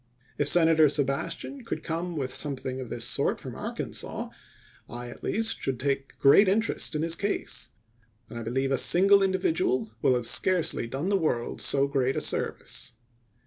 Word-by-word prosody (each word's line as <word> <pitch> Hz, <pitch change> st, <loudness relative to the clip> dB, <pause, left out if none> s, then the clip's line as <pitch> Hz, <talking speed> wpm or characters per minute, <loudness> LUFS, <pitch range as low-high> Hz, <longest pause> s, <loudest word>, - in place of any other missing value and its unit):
If 145 Hz, -, +2 dB
Senator 160 Hz, -2 st, +5 dB
Sebastian 150 Hz, -, -3 dB
could 230 Hz, -, -5 dB
come 170 Hz, +1 st, -4 dB
with 130 Hz, -4 st, -3 dB
something 130 Hz, -2 st, -2 dB
of 125 Hz, -, -8 dB
this -, -, -1 dB
sort -, -, +1 dB
from -, -, -8 dB
Arkansas, -, -, -5 dB, 0.6 s
I 120 Hz, +1 st, -7 dB
at -, -, -14 dB
least 225 Hz, +1 st, 0 dB
should 130 Hz, -3 st, -2 dB
take 135 Hz, 0 st, -3 dB
great 145 Hz, +9 st, +6 dB
interest 210 Hz, -3 st, 0 dB
in 150 Hz, -, -1 dB
his 165 Hz, 0 st, +2 dB
case; 200 Hz, +4 st, -3 dB, 0.6 s
and 120 Hz, +1 st, -8 dB
I -, -, -6 dB
believe 130 Hz, +4 st, -2 dB
a 135 Hz, -, +2 dB
single 195 Hz, +3 st, +5 dB
individual 320 Hz, -, 0 dB
will 130 Hz, -, +3 dB
have 120 Hz, -1 st, -2 dB
scarcely 170 Hz, -1 st, +2 dB
done 135 Hz, +10 st, -3 dB
the 200 Hz, -, +2 dB
world 120 Hz, -8 st, -2 dB
so 140 Hz, 0 st, +3 dB
great 135 Hz, -2 st, 0 dB
a -, -, 0 dB
service. 125 Hz, -, -3 dB
150 Hz, 170 wpm, -27 LUFS, 130-190 Hz, 0.6 s, great